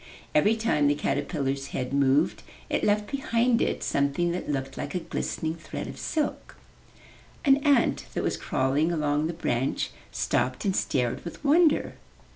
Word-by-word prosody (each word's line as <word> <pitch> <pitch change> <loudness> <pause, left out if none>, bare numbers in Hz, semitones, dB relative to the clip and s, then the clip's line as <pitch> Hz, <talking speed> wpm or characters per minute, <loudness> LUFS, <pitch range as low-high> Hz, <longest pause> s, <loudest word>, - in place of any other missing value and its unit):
Every 205 +9 +4
time 220 -10 +2
the 145 - +3
caterpillar's 140 -1 -1
head 125 0 -3
moved, 140 +2 +2 0.3
it - - 0
left 210 0 +1
behind 245 -3 +1
it - - 0
something 140 +5 +1
that 175 -2 -4
looked 135 -2 -2
like - - -5
a - - +1
glistening 160 -1 -3
thread 165 0 -6
of - - -8
silk. 305 -2 -3 0.9
An 275 -1 +6
ant 285 -1 +2
that - - -1
was - - 0
crawling 140 +5 0
along 150 -1 +1
the 170 - -3
branch 130 -5 -1 0.2
stopped 130 +8 -1
and 190 -2 +1
stared 125 -3 0
with 170 - -8
wonder. 310 +2 +4
155 Hz, 155 wpm, -27 LUFS, 140-215 Hz, 0.9 s, An